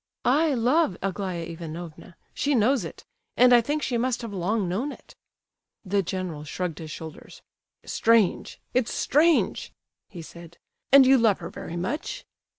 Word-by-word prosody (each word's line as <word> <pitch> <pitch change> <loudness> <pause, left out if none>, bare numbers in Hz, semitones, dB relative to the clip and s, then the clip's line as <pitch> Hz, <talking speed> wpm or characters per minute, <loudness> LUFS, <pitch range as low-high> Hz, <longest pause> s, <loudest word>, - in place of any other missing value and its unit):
"I 295 +3 +3
love 245 - +2
Aglaya 185 -3 -3
Ivanovna—she 170 - -5
knows 240 +1 +2
it,—and 245 +8 0
I 240 - +7
think 295 +5 -2
she 240 -2 -1
must 245 0 -1
have 225 -3 -6
long 195 +2 -1
known 225 +12 -2
it." - - -14 0.7
The 200 +1 +1
general 180 -4 -4
shrugged 165 +2 -4
his 160 -2 -8
shoulders. 160 0 -10 0.4
"Strange—it's 230 +2 +1
strange," 315 +3 +2 0.4
he 175 -4 -9
said, 170 +1 -13 0.3
"and 275 0 +8
you 265 0 +6
love 220 -4 +3
her 170 - -8
very 170 - -7
much?" 300 - -4
205 Hz, 140 wpm, -25 LUFS, 170-255 Hz, 0.7 s, and